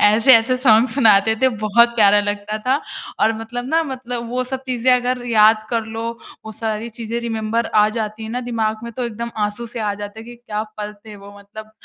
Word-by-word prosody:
ऐसे-ऐसे 230 +3 +5
सॉन्ग 240 -1 +4
सुनाते 220 -5 +4
थे 260 - +6
बहुत 235 +3 +4
प्यारा 205 -1 +6
लगता 205 +1 -3
था। 265 +3 +2 0.4
और 220 +1 +3
मतलब 245 +2 -6
ना 325 +2 +2
मतलब 245 -3 -5
वो 250 +1 -1
सब 265 +1 -5
चीज़ें 255 0 +1
अगर 250 0 0
याद 215 -1 +4
कर 230 -2 0
लो 225 0 -6 0.4
वो 220 - -7
सारी 220 +1 -4
चीज़ें 230 +1 -3
रिमेंबर 225 0 -2
आ 210 0 +5
जाती 215 0 -4
हैं 220 - -6
ना 245 +2 -3
दिमाग 220 -2 -1
में 235 - -7
तो 250 +2 -4
एकदम 235 0 -5 0.2
आँसू 210 +3 -7
से 230 +1 -7
आ 210 -1 -1
जाते 205 +1 -8
हैं - - -11
कि 240 - -10
क्या 215 -3 -4 0.2
पल 210 0 -5
थे 210 - -10
वो 200 0 -13
मतलब 215 +2 -12
225 Hz, 215 wpm, -19 LUFS, 215-240 Hz, 0.4 s, थे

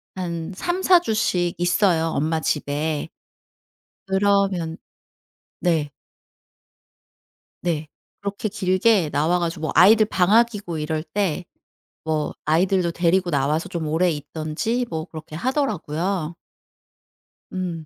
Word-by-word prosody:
한 170 -2 -4
3-4 355 - +3
주씩 190 - 0
있어요 175 -2 +2
엄마 160 +1 0
집에. 150 0 -1 1.0
그러면 195 -4 +1 0.8
네. 160 -5 +1 1.7
네. 160 -3 -1 0.3
그렇게 200 +1 -3
길게 190 -2 +2
나와 155 +5 +1
가지고 170 -2 -3
뭐 155 - -1
아이들 215 +4 +7
방학이고 205 -2 +2
이럴 155 0 -2
때 180 0 -2 0.6
뭐 155 -1 -1
아이들도 175 +2 +2
데리고 175 +1 +2
나와서 150 +2 0
좀 165 -2 -3
오래 170 +4 +2
있던지 155 - -2
뭐 160 -1 -3
그렇게 155 -2 -9
하더라고요. 185 - -1 1.2
음. 175 -4 -4
175 Hz, 210 characters per minute, -23 LUFS, 160-195 Hz, 1.7 s, 아이들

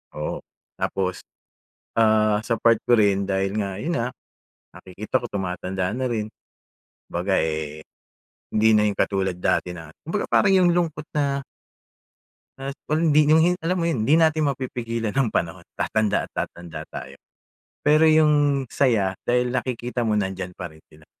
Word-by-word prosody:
Oo, 75 0 -3 0.4
tapos, 95 -1 -2 0.8
ah, 110 -2 +4
sa 115 +1 -1
part 115 -1 +3
ko 120 - +4
rin 100 -2 +2
dahil 95 0 0
nga 100 -2 -3
yun 170 +7 -2
nga 115 +1 -1 0.7
nakikita 105 +7 -3
ko - - -3
tumatanda 95 -1 -2
na 130 +1 -2
rin. 110 -3 -1 0.8
Kumbaga, 95 +3 0
eh, 80 -1 -3 0.7
hindi 110 +1 +4
na 105 - +4
yung 100 - -1
katulad 95 -2 0
dati 90 0 0
na 80 -2 -10
kumbaga 170 +6 -2
parang 195 -2 +4
yung 180 -2 +5
lungkot 160 -4 -1
na 140 -2 0 1.1
na 135 +1 -5 0.2
hindi 155 -2 +4
yung 160 +1 +6
hin 180 +1 +2
alam 170 +3 0
mo - - +1
yon, 140 -10 0
hindi 150 - +5
natin 155 -2 +3
mapipigilan 115 -5 -3
ang 135 -3 +2
panahon, 85 -3 -3
tatanda 110 -2 +1
at - - -13
tatanda 85 -1 -5
tayo. - - -9 0.7
Pero, 155 +2 +5
yung 145 -3 +3
saya 115 -9 +1
dahil 125 0 +1
nakikita 125 -1 -2
mo 110 -2 +1
nandiyan 95 -2 -3
pa 90 - -5
rin 80 - -18
sila. 80 0 -19
115 Hz, 155 wpm, -23 LUFS, 95-140 Hz, 1.1 s, yung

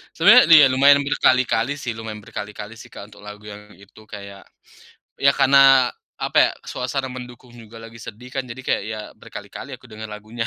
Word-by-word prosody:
Sebenernya - - +6
nih 160 0 +7
ya, - - +5
lumayan 140 +2 +4
berkali-kali 130 -2 +1
sih 135 -4 -7
lumayan 110 -1 -8
berkali-kali 105 +2 -9
sih - - -13
Kak, 100 - -12
untuk 105 0 -17
lagu 105 +1 -11
yang 105 0 -13
itu, 100 +2 -19
kayak 100 -2 -12 0.7
ya 140 0 +3
karena 135 -2 +5 0.2
apa - - -6
ya, - - +5
suasana 130 +1 -5
mendukung 125 0 -11
juga 115 -1 -14
lagi 115 0 -13
sedih 115 +3 -12
kan 135 -1 -5
jadi 125 +2 -9
kayak - - -1
ya 110 0 -6 0.2
berkali-kali - - -10
aku - - -16
dengar 110 0 -9
lagunya. 110 +2 -7
115 Hz, 185 wpm, -20 LUFS, 105-130 Hz, 0.7 s, nih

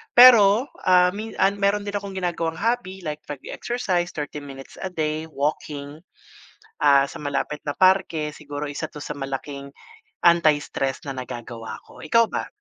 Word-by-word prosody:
pero, 240 -1 +8 0.2
ah, 180 -1 +5
min 220 +2 -5
ah, - - +6
meron 200 +1 +1
din 205 - -3
akong 200 -1 -4
ginagawang 170 -3 -2
hobby 225 -4 -1
like 150 0 -4
pag 145 -3 -6
exercise 185 -8 -2
30 150 -1 -4
minutes 135 -1 -10
a 190 - -2
day, 155 -1 -2
walking, 145 0 -3 0.8
ah, 140 -1 +6
sa - - -11
malapit 145 +1 -2
na - - +1
parke 185 -5 +3
siguro 145 0 -6
isa 145 +2 -4
to 150 - -9
sa 150 - -5
malaking 140 +1 -5 0.5
anti-stress 150 -5 +2
na - - -3
nagagawa 120 -2 -7
ko, - - -16
ikaw 230 -1 +4
ba? - - -2
155 Hz, 155 wpm, -23 LUFS, 145-190 Hz, 0.8 s, pero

